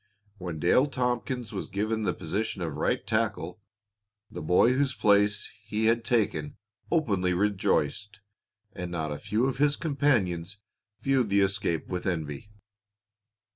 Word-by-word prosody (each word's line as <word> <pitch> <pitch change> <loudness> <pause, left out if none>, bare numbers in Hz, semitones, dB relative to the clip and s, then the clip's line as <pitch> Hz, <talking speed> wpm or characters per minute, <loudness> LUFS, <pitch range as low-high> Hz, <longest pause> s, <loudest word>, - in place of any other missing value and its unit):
When 90 -3 -5
Dale 110 - +4
Tompkins 125 -3 -2
was 95 - -4
given 110 +3 -1
the 105 - 0
position 95 +3 -3
of 80 -3 -4
right - - 0
tackle, 110 -4 -1 0.7
the - - -6
boy 90 +10 +4
whose 135 0 +1
place 105 0 +3
he 110 +1 -1
had 115 +1 +3
taken 100 -11 0 0.3
openly 100 - +1
rejoiced, 100 +1 0 0.5
and 90 0 -5
not 80 -3 -3
a 75 - -4
few 110 +4 0
of 130 -1 -2
his 145 0 +4
companions 105 - 0 0.4
viewed 135 -5 +2
the 100 0 +4
escape 95 -4 0
with 90 0 -3
envy. 80 0 -3
105 Hz, 135 wpm, -28 LUFS, 90-120 Hz, 0.7 s, Dale